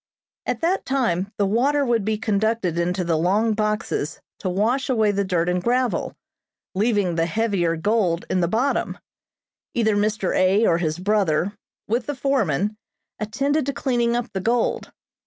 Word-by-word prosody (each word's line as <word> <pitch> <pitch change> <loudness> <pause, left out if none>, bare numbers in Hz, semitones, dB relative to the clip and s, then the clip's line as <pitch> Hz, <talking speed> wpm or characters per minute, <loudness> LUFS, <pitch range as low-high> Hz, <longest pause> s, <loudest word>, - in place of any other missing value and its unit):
At - - -2
that 350 +4 +1
time 205 -8 0
the 205 - +2
water 275 +8 +2
would 235 -4 +1
be 215 +1 0
conducted 210 -4 0
into 180 +2 0
the 165 -2 0
long 210 +6 +2
boxes 210 -7 -2 0.2
to 185 - -2
wash 230 +9 0
away 220 -5 +3
the 200 0 0
dirt 175 -3 0
and 180 0 +1
gravel, 250 +1 0 0.6
leaving 205 -3 +1
the 165 0 +1
heavier 180 -3 0
gold 185 -1 0
in 185 - 0
the 170 - +2
bottom. 240 +9 0 0.8
Either 220 -3 +2
Mr. 205 -2 0
A. 195 +4 +4
or 170 -4 +3
his 155 -2 -1
brother, 195 -2 +1 0.3
with 235 +3 -1
the 290 - -2
foreman, 215 - 0 0.4
attended 275 +8 0
to 280 - 0
cleaning 240 -3 0
up 240 -3 -2
the 190 - -2
gold. 235 +4 0
210 Hz, 160 wpm, -23 LUFS, 180-235 Hz, 0.8 s, A